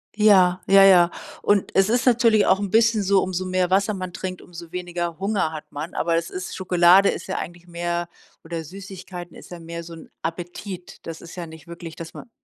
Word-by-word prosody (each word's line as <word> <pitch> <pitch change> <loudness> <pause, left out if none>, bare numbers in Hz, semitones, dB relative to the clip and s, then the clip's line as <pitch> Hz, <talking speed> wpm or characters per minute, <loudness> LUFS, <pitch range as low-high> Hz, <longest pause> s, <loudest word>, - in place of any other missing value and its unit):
Ja. 190 -4 +5
Ja, 195 0 +7
ja. 180 -3 +7 0.3
Und 205 -2 +2
es 195 +2 +3
ist 245 +2 +1
natürlich 230 -4 +4
auch 190 - +3
'n 200 -1 -3
bisschen 225 +1 +3
so, 195 0 +3
umso 185 0 -3
mehr 185 -1 0
Wasser 200 +2 +2
man 185 -2 -6
trinkt, 185 0 -5
umso 170 -1 -11
weniger 175 -2 -4
Hunger 195 -4 0
hat 155 -1 -7
man. 150 +4 -6
Aber 170 0 +1
es 165 0 -1
ist 185 0 -6
Schokolade 185 +1 +5
ist - - -4
ja 190 - -3
eigentlich 175 +1 -7
mehr 175 0 -3 0.4
oder 165 0 -5
Süßigkeiten 185 0 -9
ist - - -13
ja 175 - -9
mehr 170 0 -7
so 165 0 -10
'n 165 - -12
Appetit. 175 +2 -6
Das 165 -1 -6
ist 170 - -11
ja 175 -2 -6
nicht 160 +1 -13
wirklich, 170 -1 -9
dass 165 -1 -9
man - - -11
180 Hz, 210 wpm, -23 LUFS, 170-195 Hz, 0.4 s, Ja